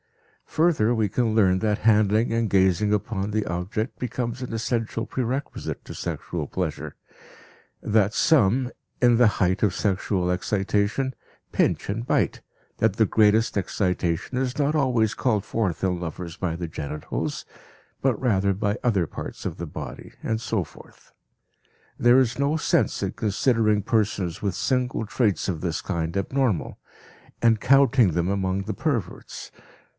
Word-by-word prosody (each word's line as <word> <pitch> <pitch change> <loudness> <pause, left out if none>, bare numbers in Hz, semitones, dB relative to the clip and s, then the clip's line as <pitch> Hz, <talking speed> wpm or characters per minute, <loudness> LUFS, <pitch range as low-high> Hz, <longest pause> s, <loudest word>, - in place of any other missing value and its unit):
Further, 155 -9 +2
we 110 -3 +1
can 110 +2 0
learn 95 -4 +4
that 105 -1 +1
handling 110 +1 +3
and 115 -1 0
gazing 95 +1 +3
upon 105 -1 -1
the 105 0 0
object 90 +7 -3
becomes 125 0 -3
an 125 - -5
essential 115 0 -2
prerequisite 130 +3 -4
to - - -8
sexual 85 -4 -4
pleasure; 90 -5 -4 0.9
that 105 -1 +2
some, 125 - +3 0.3
in 120 -1 +5
the 120 0 +5
height 95 +2 +1
of 100 -4 +3
sexual 95 -2 0
excitation, 105 +7 0 0.4
pinch - - +1
and 110 +4 -3
bite, - - 0 0.4
that 110 -3 +3
the 110 - +5
greatest 110 +1 +3
excitation 90 +2 -1
is 130 0 -1
not 145 +1 +1
always 120 -7 +2
called 110 -6 0
forth 95 -8 -2
in 90 -2 0
lovers 85 0 -6
by 90 -4 -2
the 85 -1 -4
genitals, 75 -1 -4 0.6
but 130 -5 +1
rather 100 -6 +2
by 105 +2 -1
other 100 -9 +2
parts - - -8
of - - -3
the 85 - -5
body, 70 -4 -8
and 110 0 -2
so 110 -5 -1
forth. - - -18 0.8
There 120 +2 +5
is 125 0 0
no 140 +3 +1
sense - - +1
in - - -1
considering 110 -1 +1
persons 100 -6 0
with 100 -4 -1
single 125 0 0
traits 105 -2 0
of 85 -5 -2
this 85 -4 -2
kind 85 -1 -3
abnormal, 115 - -1 0.6
and 115 -2 +3
counting 135 -5 +5
them 85 +1 0
among 95 0 -1
the 110 +2 -4
perverts. 115 - -4
105 Hz, 150 wpm, -24 LUFS, 95-120 Hz, 0.9 s, in